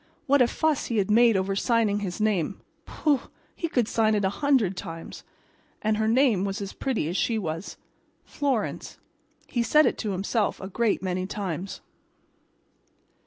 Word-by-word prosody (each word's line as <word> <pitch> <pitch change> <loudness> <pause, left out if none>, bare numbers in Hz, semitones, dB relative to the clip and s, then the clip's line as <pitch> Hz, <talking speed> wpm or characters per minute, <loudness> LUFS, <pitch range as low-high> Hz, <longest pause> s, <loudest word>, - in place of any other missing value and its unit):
What 280 0 +4
a 245 - +6
fuss 315 +2 0
he 230 - -1
had 200 0 +1
made 230 -1 +5
over 190 +1 -1
signing 220 -1 +2
his 190 -2 -4
name—pooh! 215 - -1 0.4
he 335 - -2
could 245 -7 +1
sign 220 -2 +2
it 205 -2 +1
a - - +3
hundred 255 -7 +2
times. 165 -3 -8 0.6
And 215 0 0
her 220 0 +1
name 230 -4 +3
was 200 +2 -2
as 200 -1 -5
pretty 255 - -2
as 170 - -3
she 225 +3 +1
was—"Florence," 210 - -4 0.5
he 240 - -1
said 300 +7 +4
it - - 0
to 215 - -2
himself 200 +3 -1
a 190 - -7
great 220 0 0
many 185 0 -2
times. 190 -2 -4
210 Hz, 160 wpm, -26 LUFS, 195-240 Hz, 0.6 s, a